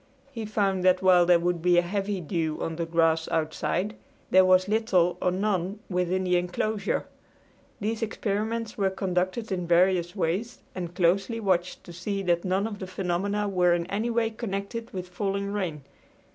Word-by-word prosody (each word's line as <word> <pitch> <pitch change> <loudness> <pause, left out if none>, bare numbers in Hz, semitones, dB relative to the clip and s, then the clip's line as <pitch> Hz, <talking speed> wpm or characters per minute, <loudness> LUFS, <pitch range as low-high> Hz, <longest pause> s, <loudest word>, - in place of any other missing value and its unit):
He 230 -5 -5
found 195 -3 0
that 185 0 +4
while 180 -2 +6
there 175 -1 +6
would 175 0 -1
be 175 0 +4
a 175 - +5
heavy 195 +1 -2
dew 160 -1 -2
on 165 - -3
the 170 -1 -2
grass 165 -1 +2
outside 165 +5 -1 0.4
there 185 0 +7
was 185 0 +4
little 200 -5 +2
or - - +2
none 190 0 -1
within 180 +1 0
the 180 -1 +2
inclosure. 195 +4 -1 0.7
These 220 +2 -2
experiments 220 +1 -2
were 195 -1 +3
conducted 190 +4 -2
in 180 -2 -2
various 175 +1 +3
ways 195 +6 -1 0.2
and 175 -2 -6
closely 195 +6 +1
watched 185 -4 0
to 175 - -11
see 195 +3 -3
that 175 -2 +1
none 190 +2 0
of 210 -2 -5
the 190 - -5
phenomena 195 +3 -1
were 180 -3 +3
in 170 -1 -2
any 215 +4 -1
way 230 -1 +1
connected 225 +1 -4
with 185 -1 -5
falling 200 +2 -2
rain. 170 -8 -3
185 Hz, 175 wpm, -27 LUFS, 175-205 Hz, 0.7 s, there